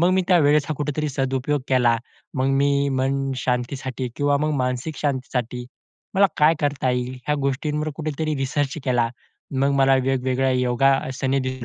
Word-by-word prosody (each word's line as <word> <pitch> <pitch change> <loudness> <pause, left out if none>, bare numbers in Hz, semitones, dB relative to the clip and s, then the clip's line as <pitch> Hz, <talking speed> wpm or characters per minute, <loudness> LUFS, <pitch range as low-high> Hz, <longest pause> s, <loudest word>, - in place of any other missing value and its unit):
मग 175 +2 +4
मी 190 0 +3
त्यावेळेचा 150 -3 +4
कुठेतरी 150 +1 -2
सदुपयोग 135 +1 -1
केला. 120 -3 +3 0.4
मग 130 0 0
मी 140 0 +2
मनशांतीसाठी 130 -1 -2
किंवा 145 0 +2
मग 150 +2 0
मानसिक 125 +4 -2
शांतीसाठी 125 -3 -2 0.5
मला 200 +1 +6
काय 155 +2 +5
करता 145 -3 0
येईल? 125 0 -1
ह्या 150 - +2
गोष्टींवर 150 +3 -1
कुठेतरी 155 0 -2
रिसर्च 135 +1 -1
केला. 120 -3 +2 0.5
मग 140 - +3
मला 135 0 +5
वेगवेगळ्या 130 0 +1
योगासने 130 +1 +1
दिसू 130 -1 -4
135 Hz, 140 wpm, -23 LUFS, 130-145 Hz, 0.5 s, मला